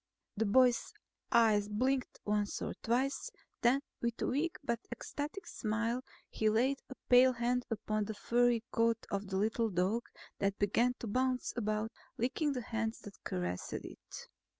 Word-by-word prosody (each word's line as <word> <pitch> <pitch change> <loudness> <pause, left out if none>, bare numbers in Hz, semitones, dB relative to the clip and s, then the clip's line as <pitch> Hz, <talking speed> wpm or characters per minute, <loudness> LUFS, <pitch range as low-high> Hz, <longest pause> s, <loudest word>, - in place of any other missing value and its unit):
The 225 +1 +1
boy's 250 +3 +4 0.4
eyes 215 -3 +4
blinked 255 +4 0
once 210 -1 0
or - - -3
twice; 255 +4 0 0.3
then 250 +3 +4 0.2
with 235 -1 -1
a - - 0
weak 305 +6 0
but 235 -4 0
ecstatic 290 +9 -5
smile 230 +3 -1 0.2
he 220 - +1
laid 255 +6 +2
a 260 - -7
pale 255 +1 +7
hand 245 +1 0
upon 215 -1 -1
the 220 - -5
furry 240 0 +2
coat 230 -1 +3
of 200 0 -2
the 190 0 -2
little 220 +3 +1
dog 195 +5 0 0.3
that 200 0 +1
began 235 +5 +2
to - - -3
bounce 255 +3 0
about, 215 -1 -1 0.3
licking 280 +5 0
the 250 - -2
hand 225 0 -2
that 205 - -11
caressed 90 0 -3
it. - - -8
230 Hz, 155 wpm, -34 LUFS, 210-250 Hz, 0.4 s, pale